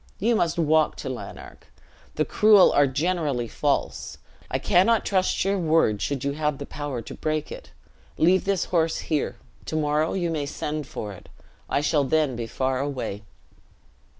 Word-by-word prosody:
you 230 Hz, +4 st, +2 dB
must 170 Hz, -5 st, 0 dB
walk 160 Hz, -1 st, +3 dB
to -, -, -7 dB
Lanark. -, -, -8 dB, 0.5 s
The -, -, +1 dB
cruel 210 Hz, -3 st, +6 dB
are 145 Hz, 0 st, +4 dB
generally 145 Hz, -3 st, -1 dB
false; -, -, -2 dB, 0.3 s
I -, -, 0 dB
cannot 205 Hz, +6 st, +3 dB
trust 185 Hz, -1 st, +1 dB
your 195 Hz, 0 st, +1 dB
word, 160 Hz, -, +2 dB
should 140 Hz, -3 st, -2 dB
you 140 Hz, -, 0 dB
have 150 Hz, 0 st, -1 dB
the 140 Hz, -, -6 dB
power 140 Hz, -6 st, -5 dB
to -, -, -9 dB
break 155 Hz, -1 st, -2 dB
it. -, -, -9 dB, 0.5 s
Leave 180 Hz, +4 st, +3 dB
this 195 Hz, -2 st, +1 dB
horse 165 Hz, -1 st, +2 dB
here: 150 Hz, -3 st, -2 dB, 0.3 s
to -, -, -4 dB
morrow 150 Hz, 0 st, +1 dB
you 175 Hz, -3 st, -1 dB
may 150 Hz, -3 st, -2 dB
send 150 Hz, 0 st, -4 dB
for 105 Hz, -4 st, -6 dB
it, 90 Hz, -, -14 dB, 0.4 s
I 140 Hz, -, +1 dB
shall 150 Hz, -1 st, +2 dB
then 145 Hz, -1 st, +1 dB
be 115 Hz, -1 st, -4 dB
far 130 Hz, +2 st, -1 dB
away." 130 Hz, -7 st, -3 dB
155 Hz, 170 wpm, -25 LUFS, 140-175 Hz, 0.5 s, cruel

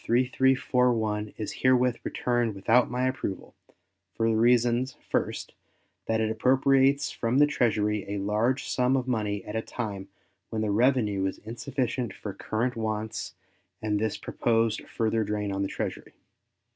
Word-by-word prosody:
3341 125 Hz, -3 st, +2 dB
is 110 Hz, -, -4 dB
herewith 125 Hz, -2 st, +3 dB
returned 120 Hz, -3 st, 0 dB
without 115 Hz, +6 st, +3 dB
my 125 Hz, +1 st, 0 dB
approval, 130 Hz, -7 st, -4 dB, 0.6 s
for 115 Hz, -, +1 dB
the 115 Hz, -, +2 dB
reasons, 120 Hz, +2 st, +3 dB, 0.2 s
first, -, -, -1 dB, 0.5 s
that 110 Hz, 0 st, +1 dB
it 110 Hz, 0 st, +1 dB
appropriates 135 Hz, +4 st, +3 dB
from 115 Hz, +2 st, -1 dB
the 145 Hz, -, +7 dB
Treasury 105 Hz, -7 st, +1 dB
a 100 Hz, -, -2 dB
large 105 Hz, +7 st, 0 dB
sum 125 Hz, +1 st, +2 dB
of 130 Hz, -1 st, -2 dB
money 105 Hz, -5 st, -1 dB
at 105 Hz, -, -6 dB
a 110 Hz, -, 0 dB
time 100 Hz, -5 st, -5 dB, 0.4 s
when 110 Hz, -1 st, -2 dB
the 105 Hz, -, 0 dB
revenue 105 Hz, -4 st, +2 dB
is 95 Hz, -, -4 dB
insufficient 120 Hz, -1 st, -3 dB
for 100 Hz, -, -6 dB
current 115 Hz, +5 st, -2 dB
wants 110 Hz, -1 st, -3 dB, 0.4 s
and 105 Hz, -1 st, -1 dB
this 110 Hz, -1 st, -1 dB
proposed 115 Hz, -1 st, 0 dB
further 110 Hz, 0 st, 0 dB
drain 105 Hz, -1 st, -2 dB
on 95 Hz, 0 st, -2 dB
the 100 Hz, -, 0 dB
Treasury. -, -, -5 dB
115 Hz, 145 wpm, -27 LUFS, 105-125 Hz, 0.6 s, the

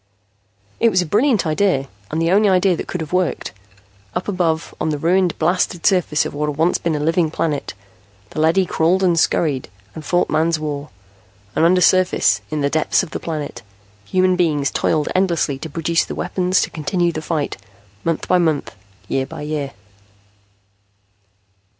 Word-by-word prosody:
It 230 Hz, -, +4 dB
was 185 Hz, -4 st, +2 dB
a -, -, -6 dB
brilliant 215 Hz, -, +2 dB
idea 155 Hz, -3 st, +1 dB, 0.2 s
and 160 Hz, -, -2 dB
the 165 Hz, +1 st, +1 dB
only 205 Hz, +2 st, +4 dB
idea 185 Hz, -1 st, +3 dB
that -, -, -6 dB
could 180 Hz, -, -4 dB
have 160 Hz, +2 st, -6 dB
worked. 180 Hz, -2 st, 0 dB, 0.6 s
Up -, -, -2 dB
above, 170 Hz, -5 st, -1 dB
on -, -, 0 dB
the 150 Hz, -, -1 dB
ruined, 175 Hz, +3 st, +1 dB
blasted 175 Hz, +1 st, 0 dB
surface 180 Hz, -6 st, +2 dB
of -, -, -5 dB
what 150 Hz, +1 st, -1 dB
had 145 Hz, -, -5 dB
once 165 Hz, +3 st, +2 dB
been 165 Hz, -2 st, -1 dB
a -, -, -2 dB
living 165 Hz, +2 st, +1 dB
planet, 150 Hz, -, -2 dB, 0.6 s
the -, -, -5 dB
leady 165 Hz, +4 st, +3 dB
crawled 175 Hz, +3 st, +1 dB
and 175 Hz, -3 st, +3 dB
scurried, 145 Hz, -, +1 dB, 0.2 s
and 160 Hz, -, -8 dB
fought 175 Hz, +2 st, +1 dB
Man's 160 Hz, +1 st, +1 dB
war. 150 Hz, -1 st, -4 dB, 0.7 s
And -, -, +2 dB
undersurface, 185 Hz, +1 st, +3 dB
in 155 Hz, -1 st, -2 dB
the 140 Hz, -, +2 dB
depths 155 Hz, +4 st, +2 dB
of 175 Hz, -, -8 dB
the -, -, -4 dB
planet, 155 Hz, -3 st, -5 dB, 0.4 s
human 185 Hz, -, +2 dB
beings 150 Hz, -6 st, +1 dB
toiled 155 Hz, -2 st, 0 dB
endlessly 170 Hz, -7 st, +1 dB
to 160 Hz, -, -6 dB
produce 165 Hz, +2 st, 0 dB
the -, -, -6 dB
weapons 185 Hz, 0 st, 0 dB
to -, -, -4 dB
continue 170 Hz, +3 st, 0 dB
the 155 Hz, -, -5 dB
fight, 155 Hz, -2 st, -2 dB, 0.5 s
month 165 Hz, -1 st, -1 dB
by 180 Hz, -, +3 dB
month, 160 Hz, -4 st, 0 dB, 0.3 s
year 135 Hz, 0 st, -1 dB
by -, -, -8 dB
year. 150 Hz, -2 st, -3 dB
165 Hz, 175 wpm, -19 LUFS, 155-180 Hz, 0.7 s, It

